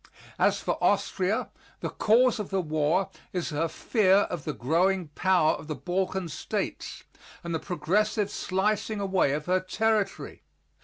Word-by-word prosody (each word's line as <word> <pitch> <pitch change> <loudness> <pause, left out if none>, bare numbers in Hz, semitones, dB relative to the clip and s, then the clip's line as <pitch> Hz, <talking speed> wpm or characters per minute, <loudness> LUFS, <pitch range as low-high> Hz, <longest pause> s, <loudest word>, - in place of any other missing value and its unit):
As - - +3
for - - -3
Austria, - - +1 0.3
the - - -3
cause 240 +2 +3
of 210 - -4
the 195 - 0
war 155 +3 0 0.2
is 180 -3 -2
her 155 +3 0
fear 195 +2 +3
of 175 -5 -5
the 150 - -2
growing 175 +6 +1
power 175 0 +3
of - - -5
the 155 - -3
Balkan 185 +1 -2
States, 155 - -4 0.4
and 170 -1 -4
the 160 - 0
progressive 205 +5 0
slicing 210 +3 -1
away 190 -8 +1
of 150 +1 -3
her 185 +1 +2
territory. 215 +2 -1
185 Hz, 150 wpm, -27 LUFS, 160-200 Hz, 0.4 s, As